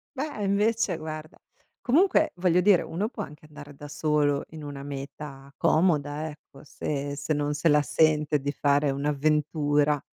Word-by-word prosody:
Beh, 275 -6 -4
invece 210 +3 +1
guarda. 155 0 -8 0.4
Comunque, 315 +4 +3
voglio 180 0 +2
dire, 185 -1 +5
uno 195 +6 -2
può 225 -2 -6
anche 150 -3 -12
andare 145 -1 -12
da 145 +1 -10
solo 150 -1 +1
in 160 -1 -10
una 145 -1 -7
meta 140 0 -8
comoda, 155 -3 +1
ecco; 150 0 -15
se 145 -1 -4
se 145 +2 -2
non 145 0 -1
se 150 +3 +1
la 150 0 +5
sente 150 0 +2
di 140 +1 -2
fare 145 0 +2
un'avventura 145 +1 +1
150 Hz, 155 wpm, -26 LUFS, 145-165 Hz, 0.4 s, dire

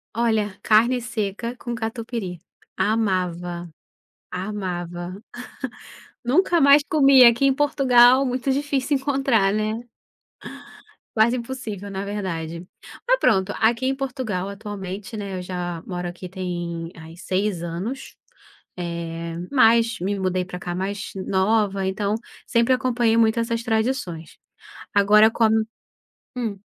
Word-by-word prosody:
Olha, 220 -4 0
carne 235 +4 +4
seca 230 0 -3
com 240 -1 -5
catupiry. 225 -5 -4 0.4
Amava, 180 -5 -1 0.6
amava. 180 -1 -5 1.0
Nunca 340 +7 +3
mais 280 +1 +7
comia 275 -5 +7
aqui 235 +4 +1
em 270 - +4
Portugal, 265 -2 +5
muito 255 +1 -1
difícil 280 0 0
encontrar, 265 -7 +1
né. 215 +3 -2 1.3
Quase 225 +3 +4
impossível 230 -5 -6
na 195 0 -4
verdade. 170 -5 -4 0.4
Mas - - +4
pronto, 190 - +2
aqui 235 +3 +2
em 270 - +1
Portugal 255 -9 -3
atualmente, 200 0 -6
né, 200 -2 -5
eu - - -5
já 175 -2 -4
moro 180 -2 -4
aqui 175 +1 -8
tem 175 -2 -4
aí 165 0 -12
6 185 -1 -1
anos, 185 +11 -5 0.6
eh, 170 -1 -5 0.2
mas 230 -4 +4
me 195 +2 -2
mudei 185 -1 0
pra 180 0 -7
cá 175 0 -4
mais 195 +2 -4
nova 195 +1 +1
então 200 +1 -1 0.3
sempre 235 +2 +2
acompanhei 245 -3 +1
muito 225 0 +3
essas 230 0 -1
tradições. 220 -8 -2 0.6
Agora 210 +2 +6
com 230 - 0
a 220 - +4 0.9
hum. 215 -5 -3
210 Hz, 120 wpm, -23 LUFS, 185-240 Hz, 1.3 s, mais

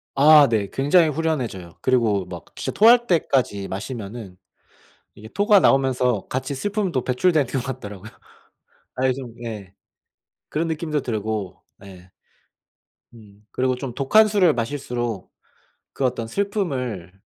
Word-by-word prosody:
아 150 +1 +7
네. 105 -4 0
굉장히 155 +4 +3
후련해져요. 130 - -3
그리고 115 -7 +1
막 90 -3 -9
진짜 - - -4
토할 235 +3 +6
때까지 130 - 0
마시면은 105 -1 -7 0.8
이게 110 - -12
토가 205 - +4
나오면서 125 - +2
같이 130 +2 -3
슬픔도 190 - -2
배출되는 145 +2 +1
것 130 - -2
같더라고요. 110 -6 -7 0.9
아 130 +1 +1
좀 125 -3 -8
예. 105 -5 -7 0.8
그런 165 +2 -2
느낌도 155 -2 -2
들고. 110 -5 -4 0.2
네. 95 -2 -14 1.0
음. 105 -2 -18
그리고 130 0 0
좀 125 -1 -6
독한 180 - +4
술을 195 -6 +3
마실수록 120 -4 -4 0.6
그 140 - -3
어떤 125 -3 -1
슬픔을 130 - -3
125 Hz, 270 characters per minute, -22 LUFS, 105-150 Hz, 1.0 s, 아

